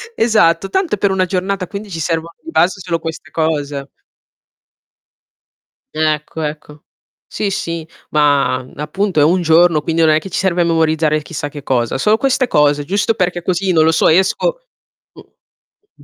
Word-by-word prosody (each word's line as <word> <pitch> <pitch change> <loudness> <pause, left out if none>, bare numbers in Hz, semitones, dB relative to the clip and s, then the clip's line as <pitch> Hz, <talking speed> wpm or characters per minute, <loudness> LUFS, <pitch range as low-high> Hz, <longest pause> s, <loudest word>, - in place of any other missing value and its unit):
Esatto 195 -5 +2
tanto 380 - 0
è - - -15
per 200 0 +1
1 185 -1 +1
giornata 185 +1 -2
quindi 200 +3 -8
ci 165 -3 -6
servono 165 +1 -2
di 325 - -8
base 190 - +1
solo 170 -2 -2
queste 160 -1 -7
cose. 145 -3 -2 2.1
Ecco, 155 0 -1
ecco. 150 0 -6 0.4
Sì, 210 - -3
sì, 170 -4 -4 0.3
ma, 140 -4 +2
mhmm, 130 - -17
appunto 180 +4 -1
è - - +5
1 175 +5 +3
giorno, 165 -1 +4
quindi 165 +1 -1
non 160 -1 +5
è 155 - +3
che 195 - -9
ci 180 - -4
serve 180 -2 +1
memorizzare 160 -2 +1
chissà 150 -1 -6
che 145 -1 -10
cosa. 125 -2 0
Solo 210 +11 +3
queste 265 0 +1
cose 145 -5 +2
giusto 200 +6 0
perché 180 -4 -1
così, 185 +2 -1
non 160 -2 +4
lo 160 - +4
so, 160 - +2
esco 190 - +2 0.5
mh. 415 - -23
165 Hz, 170 wpm, -16 LUFS, 150-190 Hz, 2.1 s, è